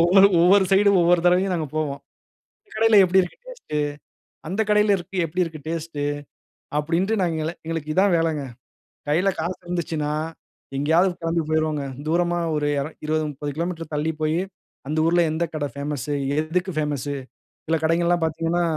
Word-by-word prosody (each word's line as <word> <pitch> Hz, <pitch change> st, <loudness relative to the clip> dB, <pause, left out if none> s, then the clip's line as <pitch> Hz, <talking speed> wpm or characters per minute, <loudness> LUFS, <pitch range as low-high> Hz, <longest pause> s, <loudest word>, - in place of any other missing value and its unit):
ஒவ்வொரு 190 Hz, +3 st, +7 dB
ஒவ்வொரு 190 Hz, +3 st, +6 dB
சைடும், 200 Hz, 0 st, +5 dB
ஒவ்வொரு 175 Hz, 0 st, +4 dB
தடவயும் 180 Hz, +1 st, +3 dB
நாங்க 160 Hz, -3 st, -2 dB
போவோம். 145 Hz, -3 st, -2 dB, 0.7 s
"இந்தக் -, -, -12 dB
கடையில 220 Hz, -1 st, +5 dB
எப்டி 185 Hz, +1 st, +4 dB
இருக்கு 180 Hz, -, -7 dB
டேஸ்ட்டு? -, -, -5 dB, 0.7 s
அந்த 190 Hz, +5 st, -2 dB
கடையில 210 Hz, -1 st, +4 dB
இருக்கு 185 Hz, +1 st, -8 dB
எப்டி 180 Hz, +4 st, -1 dB
இருக்கு 160 Hz, -2 st, -8 dB
டேஸ்ட்டு?" 160 Hz, -3 st, -3 dB, 0.8 s
அப்டின்ட்டு 180 Hz, +8 st, 0 dB
நாங்க 165 Hz, -3 st, 0 dB
எல்லாம் 165 Hz, +2 st, -4 dB
எங்களுக்கு 160 Hz, -2 st, -3 dB
இதுதான் 190 Hz, +4 st, +3 dB
வேலங்க. 160 Hz, -3 st, 0 dB, 0.7 s
கையில 170 Hz, +6 st, +2 dB
காசு 175 Hz, +3 st, -3 dB
இருந்துச்சுன்னா, 160 Hz, -4 st, -2 dB, 0.6 s
எங்கேயாவது 165 Hz, +6 st, +3 dB
கிளம்பி 165 Hz, 0 st, 0 dB
போயிருவோங்க. 155 Hz, -2 st, 0 dB, 0.2 s
தூரமா 175 Hz, +2 st, +1 dB, 0.2 s
ஒரு 150 Hz, -1 st, 0 dB
எர 140 Hz, -, -2 dB, 0.2 s
இருவது, 155 Hz, 0 st, 0 dB
30 145 Hz, +1 st, -5 dB
கிலோமீட்டர் 165 Hz, -1 st, -4 dB
தள்ளி 150 Hz, +2 st, 0 dB
போயி, 155 Hz, +2 st, +1 dB, 0.5 s
அந்த 155 Hz, +1 st, -1 dB
ஊர்ல 175 Hz, +1 st, +3 dB
எந்த 165 Hz, +2 st, 0 dB
கடை 145 Hz, -2 st, -2 dB
பேமஸூ? 145 Hz, 0 st, -3 dB, 0.3 s
எதுக்கு 175 Hz, +4 st, -1 dB
பேமஸூ? 145 Hz, -2 st, -2 dB, 0.5 s
சில 165 Hz, +1 st, +2 dB
கடைங்கள்லாம் 170 Hz, +1 st, +2 dB
பார்த்தீங்கன்னா, 165 Hz, +2 st, 0 dB
165 Hz, 155 wpm, -23 LUFS, 155-180 Hz, 0.8 s, ஒவ்வொரு